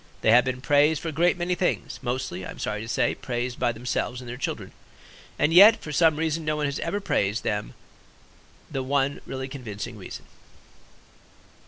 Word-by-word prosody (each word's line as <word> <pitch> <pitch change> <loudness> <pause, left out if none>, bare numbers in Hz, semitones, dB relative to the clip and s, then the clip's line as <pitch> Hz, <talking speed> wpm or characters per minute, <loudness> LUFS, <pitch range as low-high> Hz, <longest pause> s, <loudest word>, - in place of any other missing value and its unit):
They 110 - +4
have 125 +3 +6
been 130 -1 -3
praised 145 +2 +3
for 165 - -4
a - - -4
great 170 +4 +2
many 175 +1 -1
things, 180 0 -1
mostly, 125 -8 -3
I - - -7
am - - -8
sorry 105 0 -3
to 110 - -7
say, 115 - +1
praised 125 0 -4
by - - +2
themselves 120 +1 -3
and 125 - -10
their 120 - -5
children. 130 - -4 0.7
And 155 - +2
yet 205 +5 +9
for 150 - -8
some 160 0 +4
reason 160 +1 -1
no 155 0 0
one 150 -1 -1
has 140 -1 -2
ever 195 +5 -2
praised 105 - 0
them 105 -2 -2 1.0
the 135 - -2
one 140 +1 0
really 130 0 -4
convincing 125 -7 -7
reason. - - -9
135 Hz, 190 wpm, -25 LUFS, 120-160 Hz, 1.0 s, yet